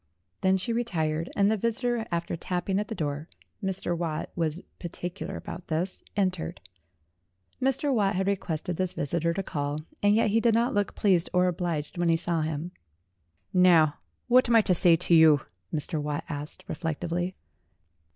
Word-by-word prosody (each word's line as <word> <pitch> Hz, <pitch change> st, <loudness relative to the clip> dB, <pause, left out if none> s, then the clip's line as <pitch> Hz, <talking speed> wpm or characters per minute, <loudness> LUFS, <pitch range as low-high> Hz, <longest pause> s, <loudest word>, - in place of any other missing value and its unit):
Then 190 Hz, 0 st, +3 dB
she 230 Hz, +5 st, -2 dB
retired, 165 Hz, -9 st, -1 dB
and 200 Hz, +1 st, +3 dB
the 220 Hz, -, +1 dB
vis 230 Hz, +3 st, -1 dB
itor, 240 Hz, -2 st, 0 dB
after 170 Hz, 0 st, -2 dB
tapping 180 Hz, +3 st, -1 dB
at 210 Hz, -, -2 dB
the -, -, -5 dB
door 150 Hz, -1 st, -3 dB, 0.3 s
Mr. 190 Hz, -2 st, -1 dB
Watt 165 Hz, -2 st, -3 dB
was 165 Hz, 0 st, -2 dB, 0.2 s
partic 175 Hz, 0 st, -5 dB
ular -, -, -4 dB
about 175 Hz, -, -8 dB
this 170 Hz, +3 st, -2 dB, 0.2 s
entered. 185 Hz, -4 st, -1 dB, 1.0 s
Mr. 270 Hz, +2 st, +1 dB
Watt 200 Hz, -5 st, +2 dB
had 190 Hz, +1 st, 0 dB
requested 180 Hz, -3 st, -2 dB
this 185 Hz, -1 st, -1 dB
visitor 170 Hz, +3 st, 0 dB
to 195 Hz, +3 st, -2 dB
call, 145 Hz, -2 st, -3 dB, 0.2 s
and 205 Hz, 0 st, +4 dB
yet 220 Hz, -1 st, +3 dB
he 220 Hz, +3 st, +3 dB
did 230 Hz, -1 st, +3 dB
not 235 Hz, +2 st, +2 dB
look 205 Hz, -1 st, 0 dB
pleased 185 Hz, -5 st, +2 dB
or 180 Hz, 0 st, +5 dB
obliged 170 Hz, -2 st, -2 dB
when 175 Hz, -1 st, +2 dB
he 165 Hz, -, +4 dB
saw 170 Hz, -1 st, -1 dB
him. 155 Hz, +2 st, -3 dB, 0.8 s
"Now, 170 Hz, -5 st, +5 dB, 0.3 s
what 250 Hz, 0 st, +5 dB
am 235 Hz, -, +4 dB
I 225 Hz, -, +8 dB
to 190 Hz, -, +2 dB
say 170 Hz, 0 st, +6 dB
to 165 Hz, -, 0 dB
you?" 160 Hz, -3 st, +7 dB, 0.3 s
Mr. 155 Hz, +1 st, -2 dB
Watt 150 Hz, +2 st, -2 dB
asked 145 Hz, -1 st, -5 dB
reflectively. 175 Hz, +3 st, -2 dB
175 Hz, 175 wpm, -27 LUFS, 160-200 Hz, 1.0 s, I